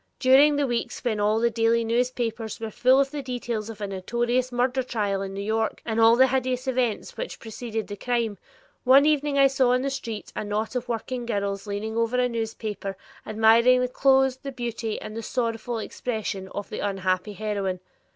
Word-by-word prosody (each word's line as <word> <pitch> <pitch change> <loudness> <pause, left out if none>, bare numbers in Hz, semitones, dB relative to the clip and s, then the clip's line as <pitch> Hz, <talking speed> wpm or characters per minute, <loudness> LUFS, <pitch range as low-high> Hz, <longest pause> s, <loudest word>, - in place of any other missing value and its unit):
During 280 +3 +6
the 285 0 +1
weeks 240 -3 -3
when 225 -4 0
all 210 +2 +2
the 235 +1 +2
daily 230 +1 +2 0.3
papers 225 -2 -3
were 225 -1 -5
full 255 +5 +4
of 275 0 +1
the 295 -1 -4
details 240 -4 -4
of 220 -2 -9
a - - -1
notorious 240 +6 -1
murder 250 +2 +1
trial 205 -6 -1
in 195 -1 -4
New 200 - -4
York 220 +1 -1
and 225 -1 -1
all 225 +1 +7
the 260 +2 +6
hideous 255 0 -1
events 250 -4 -1
which - - -5
preceded 225 0 -5
the 205 - -7
crime, 230 -2 -1 0.4
one 270 +3 +6
evening 295 -2 +2
I 275 - +7
saw 265 -2 +3
in 255 +1 +1
the 275 - -1
street 230 -5 -6
a - - -2
knot 215 +3 -2
of 250 0 -3
working 240 +1 -3
girls 200 -2 -2
leaning 215 +2 -3
over 230 +2 +1
a 250 0 +3
newspaper, 220 -4 -4 0.3
admiring 225 +3 +5
the 250 - +1
clothes, 265 0 +3
the 275 +1 -7
beauty, 235 -3 -4
and 220 +1 -6
"sorrowful 235 0 -2
expression" 220 -4 -4
of 205 +1 -7
the - - -4
unhappy 190 0 -1
heroine. 200 -3 -2
230 Hz, 190 wpm, -25 LUFS, 215-255 Hz, 0.4 s, all